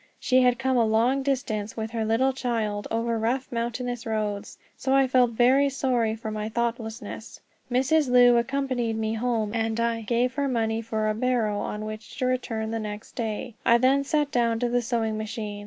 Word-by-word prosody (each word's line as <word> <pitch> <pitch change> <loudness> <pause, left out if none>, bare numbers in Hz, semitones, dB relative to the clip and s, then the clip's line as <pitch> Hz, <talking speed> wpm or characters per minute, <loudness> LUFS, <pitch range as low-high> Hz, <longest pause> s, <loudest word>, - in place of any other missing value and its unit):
She 255 -1 +3
had 250 -1 +3
come 265 0 +1
a 235 - +4
long 230 +5 +2
distance, 235 -6 -2
with 220 0 -3
her 225 -1 -2
little 230 +5 +2
child, 225 -5 -2
over 230 0 -1
rough 250 +4 -1
mountainous 240 0 -3
roads, 215 -3 -3 0.2
so 265 0 0
I 270 0 +5
felt 255 -1 +3
very 260 +4 +4
sorry 245 -5 0
for 220 -1 -6
my 215 0 -3
thoughtlessness. 225 -1 -4 0.3
Mrs. 265 +3 +2
Lu 245 -1 +6
accompanied 245 -2 -1
me 220 0 -1
home, 225 -2 -1
and 225 0 -1
I 230 0 0
gave 240 +3 0
her 280 +1 -1
money 225 -3 0
for 220 -1 -2
a 215 - +1
barrow 225 -3 0
on 210 +1 -4
which 215 -3 -8
to 255 - -1
return 230 -3 -1
the 225 - -2
next 210 0 -6
day. 225 +1 -4
I 235 - +5
then 265 +3 +3
sat 295 0 0
down 235 -2 +1
to 245 - +1
the 245 0 +1
sewing 225 -2 -1
machine. 215 -1 -5
235 Hz, 190 wpm, -26 LUFS, 220-255 Hz, 0.3 s, Lu